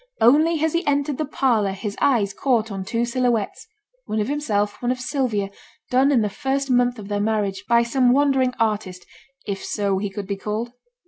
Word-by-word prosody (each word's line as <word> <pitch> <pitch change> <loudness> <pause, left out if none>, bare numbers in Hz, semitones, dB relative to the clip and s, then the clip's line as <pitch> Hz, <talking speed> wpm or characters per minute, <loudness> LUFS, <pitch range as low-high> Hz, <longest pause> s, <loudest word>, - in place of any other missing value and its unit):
Only 310 +6 +4
as 320 - +1
he 335 +2 +1
entered 285 -1 0
the 310 - 0
parlour 230 -9 +1
his 205 +1 -5
eyes 220 -8 +2
caught 230 -2 0
on 195 -1 -4
two 230 +5 -1
silhouettes, 240 - -1 0.4
one 215 - -1
of 210 - -1
himself, 210 -9 -1
one 245 0 0
of 255 - -2
Sylvia, 250 -7 -1 0.4
done 265 +3 +4
in 250 -5 +4
the - - +1
first 270 +6 -2
month 245 0 +2
of 205 -2 -8
their 205 0 -1
marriage, 205 -2 -1
by 235 0 +5
some 245 +1 +2
wandering 265 -2 +2
artist, 205 -5 -1 0.4
if 195 -1 -4
so 200 -2 -1
he 205 0 -2
could 195 +1 -6
be 200 +1 -3
called. 215 +4 -3
235 Hz, 195 wpm, -22 LUFS, 205-265 Hz, 0.4 s, by